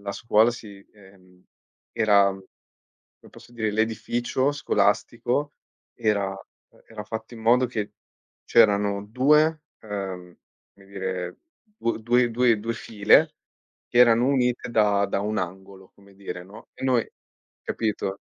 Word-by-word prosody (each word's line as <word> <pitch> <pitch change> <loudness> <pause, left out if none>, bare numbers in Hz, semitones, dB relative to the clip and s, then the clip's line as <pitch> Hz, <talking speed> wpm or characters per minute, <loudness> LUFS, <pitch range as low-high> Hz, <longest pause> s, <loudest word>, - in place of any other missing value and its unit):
la 100 0 -5
scuola 110 +2 +3
si 105 -4 -11
ehm, 95 -3 -20 0.5
era 100 -3 +4
come 95 -1 -14 0.6
posso 120 - -16
dire, 110 -2 -2
l'edificio 115 +5 -1
scolastico 145 -1 0 0.4
era, 105 -4 0
uhm, 95 0 -14
era 110 -2 -8
fatto 110 +2 -7
in 115 - -11
modo 125 +3 +3
che 105 -2 -4 0.5
c'erano 100 -3 +3
2 150 +7 +3 0.2
uhm, 95 -4 -6 0.4
come 100 - -20
dire 95 -2 -5 0.4
du 115 - -1
due 120 +1 +2
due 120 -2 +2
due, 115 +2 -3
file 115 +11 +3 0.5
che 120 - -2
erano 120 0 +6
unite 125 -2 0
da 105 -3 +3
da 100 - -2
un 105 +1 -2
angolo, 95 +1 -7
come 100 0 -21
dire, 95 -2 -7
no, 105 +5 -14
e - - -11
noi, 125 -3 +1 0.5
capito, 105 -3 -3
110 Hz, 130 wpm, -24 LUFS, 100-120 Hz, 0.6 s, erano